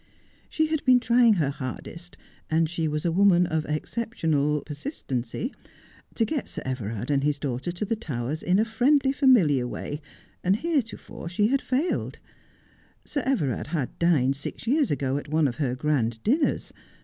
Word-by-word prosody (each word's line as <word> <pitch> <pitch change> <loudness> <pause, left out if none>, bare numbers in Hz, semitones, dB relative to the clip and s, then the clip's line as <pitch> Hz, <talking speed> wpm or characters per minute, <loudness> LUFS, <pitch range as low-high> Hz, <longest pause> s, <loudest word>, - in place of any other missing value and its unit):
She 315 - +1
had 310 -1 -1
been 255 -1 +6
trying 235 -1 +5
her 150 -6 +1
hardest 165 +6 -7 0.2
— - - -32
and 160 +1 +2
she 165 0 -2
was 150 +1 -2
a 170 - +2
woman 180 0 +5
of 160 -2 -1
exceptional 150 -4 -1
persistency 145 - -4 0.3
— - - -27
to 225 - +2
get 295 +2 -2
Sir - - -4
Everard 120 -1 -3
and 140 -1 +2
his 145 0 +1
daughter 135 +3 -3
to 175 +4 -3
the 225 - 0
Towers 150 - -4
in 180 +2 +2
a 215 - +3
friendly, 265 +5 +3
familiar 190 - +4
way, 145 +4 -5 0.4
and 185 +2 +3
hereto 275 -4 -1
fore 170 - -9
she 205 +5 +2
had 275 +1 +2
failed. 275 +8 -1 0.9
Sir 285 - -2
Everard 155 - 0
had 150 -5 -3
dined 140 -6 +3
six 145 - -6
years 280 +4 +2
ago 135 -1 0
at 145 - -6
one 155 0 +2
of 125 - -4
her 130 -5 0
grand 125 -5 0
dinners. 285 +7 +1
165 Hz, 175 wpm, -26 LUFS, 140-235 Hz, 0.9 s, been